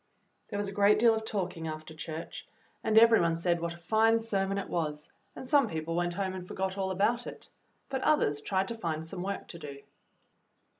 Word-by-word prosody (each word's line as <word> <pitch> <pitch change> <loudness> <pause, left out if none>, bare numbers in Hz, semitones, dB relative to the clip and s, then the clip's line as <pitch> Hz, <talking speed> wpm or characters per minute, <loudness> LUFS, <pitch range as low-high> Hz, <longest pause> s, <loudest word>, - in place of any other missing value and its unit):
There 205 - -4
was 205 0 -1
a - - -4
great 205 +1 +5
deal 230 +1 +5
of 220 0 -3
talking 180 -6 -3
after 155 0 -6
church, 160 +1 -7 0.4
and 220 -1 +2
every 230 0 +7
one 165 -1 +2
said 170 +1 +1
what 170 0 -3
a - - -13
fine 220 +6 +3
sermon 195 -3 -1
it 200 - -3
was; 150 -3 -3 0.2
and 260 - -8
some 285 +1 +4
people 160 +1 -3
went 175 0 0
home 190 -1 -2
and 185 -1 -7
forgot 190 0 -2
all 190 -1 -1
about 215 +6 +1
it, - - -9 0.4
but 265 -1 -3
others 150 - +2
tried 190 +4 0
to 230 - -3
find 160 -7 -3
some 170 +2 -6
work 200 +2 -4
to 170 - -8
do. 140 -3 -8
190 Hz, 210 wpm, -30 LUFS, 165-220 Hz, 0.4 s, every